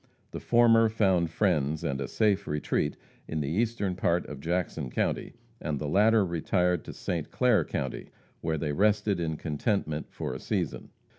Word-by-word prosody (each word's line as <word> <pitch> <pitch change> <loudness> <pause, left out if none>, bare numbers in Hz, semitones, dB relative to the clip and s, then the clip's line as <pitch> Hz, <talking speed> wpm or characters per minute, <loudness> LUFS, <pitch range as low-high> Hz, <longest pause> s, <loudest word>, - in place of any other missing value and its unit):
The - - -5
former 115 -1 +5
found 95 -6 +2
friends 80 -5 +1
and 70 0 -2
a 70 - -2
safe 105 - +1
retreat 75 0 -1 0.3
in 80 - -3
the 70 -2 -2
eastern 105 +1 0
part 85 -1 +1
of 70 -2 -8
Jackson 80 -3 -2
county, - - -1 0.3
and 75 -3 -2
the 75 - -3
latter 105 +5 +4
retired 90 0 0
to - - -6
St. 85 -4 -3
Clair 125 -4 +3
county, 65 - -4 0.3
where 80 -1 -1
they 75 -1 -2
rested 105 +2 +2
in 80 -2 -2
contentment 80 0 -1
for - - -5
a - - -6
season. - - -3
85 Hz, 165 wpm, -28 LUFS, 75-105 Hz, 0.3 s, former